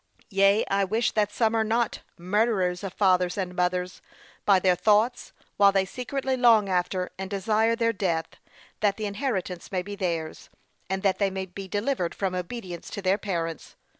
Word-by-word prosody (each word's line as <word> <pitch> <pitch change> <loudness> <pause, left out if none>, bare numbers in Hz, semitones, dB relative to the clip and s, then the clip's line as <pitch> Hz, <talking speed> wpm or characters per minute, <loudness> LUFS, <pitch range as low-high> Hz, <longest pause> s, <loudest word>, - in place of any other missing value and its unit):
Yea, 195 +2 +4
I 200 0 +1
wish 220 +5 +1
that 210 -1 +1
some 225 +1 +1
are 225 -1 +2
not 230 +1 0 0.2
'murderers 185 -1 0
of 195 - -4
fathers 185 -2 +2
and 185 -2 -3
mothers,' 180 0 -1 0.4
by 200 -2 +6
their 185 0 +3
thoughts, 215 +6 +2 0.3
while 200 -1 +6
they 195 -1 +2
secretly 260 +5 -3
long 230 -5 +5
after, 180 0 -1
and 190 0 -4
desire 215 +3 +1
their 230 0 +1
death, 170 -5 -1 0.5
that 205 -2 +1
the 215 - -3
inheritance 200 -5 -3
may 185 -2 -1
be 205 +2 -7
theirs, 170 -5 -3 0.4
and 190 +1 -2
that 195 -2 +2
they 200 -1 +2
may 190 0 -4
be 190 +1 -9
delivered 205 -2 -1
from 190 -2 -2
obedience 180 -1 -6
to 200 - -6
their 190 +2 +2
parents. 165 -6 -4
195 Hz, 175 wpm, -26 LUFS, 180-215 Hz, 0.5 s, by